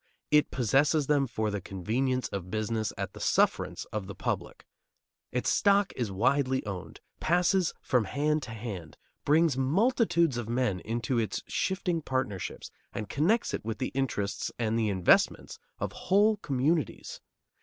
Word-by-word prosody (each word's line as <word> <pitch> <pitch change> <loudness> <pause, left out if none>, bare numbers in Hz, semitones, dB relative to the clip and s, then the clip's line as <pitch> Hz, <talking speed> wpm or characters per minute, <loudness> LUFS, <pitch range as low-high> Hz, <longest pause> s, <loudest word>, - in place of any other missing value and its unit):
It 150 0 +4
possesses 140 +5 +2
them 140 -1 +2
for 110 -2 -2
the 100 -1 -3
convenience 120 +8 -1
of 95 -2 -5
business 110 +2 -1
at - - -4
the - - -10
sufferance - - +1
of 105 -3 -3
the 100 - -7
public. - - -4 0.7
Its 125 - -1
stock 200 -1 +3
is 115 -5 -2
widely 130 +5 +1
owned, 95 -3 -7 0.2
passes 180 +1 +2
from 125 -4 +2
hand 150 +7 0
to 135 - -8
hand, 100 -9 -7 0.3
brings 150 -2 +3
multitudes 170 - +2
of 115 -2 -4
men 120 -6 0
into 115 +4 -1
its 110 - -2
shifting 180 -3 -1
partnerships 130 - -3 0.2
and 105 -2 -5
connects 190 - +1
it - - -3
with 110 0 -3
the 130 - -2
interests 125 -7 -2
and 115 -2 0
the 110 -2 +1
investments 95 -3 +2 0.2
of - - -3
whole 210 +3 +3
communities. 145 -1 -1
130 Hz, 150 wpm, -29 LUFS, 110-155 Hz, 0.7 s, It